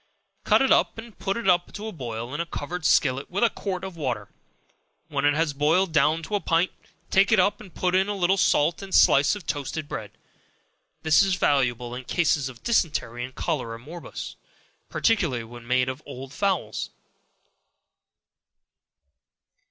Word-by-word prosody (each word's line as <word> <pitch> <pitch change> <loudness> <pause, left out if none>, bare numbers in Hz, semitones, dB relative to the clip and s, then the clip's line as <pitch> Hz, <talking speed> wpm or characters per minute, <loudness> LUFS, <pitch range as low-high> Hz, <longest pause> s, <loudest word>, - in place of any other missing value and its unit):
Cut - - +4
it 265 - +2
up - - +3
and 225 -1 -10
put 195 +1 -1
it 235 - -4
to 195 +4 0
boil 120 - -6
in 150 - -2
a - - -3
covered 170 +3 -5
skillet 135 0 +2
with 195 +5 -1
a 235 - +4
quart 185 -3 -4
of 190 -2 -6
water; 125 -10 -3 0.8
when - - -1
it 145 0 +4
has 160 -1 +1
boiled 160 +6 +2
down 155 +2 +3
to 160 - -8
a 205 - +2
pint, 170 0 +1 0.4
take 195 +2 +4
it 215 - +5
up, 195 +3 +2
and 195 -4 -12
put 180 +1 -1
in 190 +2 +3
a 205 - -1
little 190 0 +2
salt 165 -2 +2
and 195 -1 -3
slice 140 +8 +5
of 200 -5 -9
toasted 145 +1 -3
bread. 105 -6 -5 0.9
This 155 +2 +5
is 195 -2 +2
valuable 125 -7 +1
in 125 0 -7
cases 145 -5 +1
of 125 -3 -14
dysentery 150 - 0
and 130 +1 -8
cholera 115 -8 -2
morbus, 160 +8 -8 0.5
particularly 170 - +1
when 120 +1 -12
made 125 0 +2
of 130 +3 -4
old 135 -1 -8
fowls. 180 - -1
155 Hz, 165 wpm, -25 LUFS, 130-190 Hz, 0.9 s, it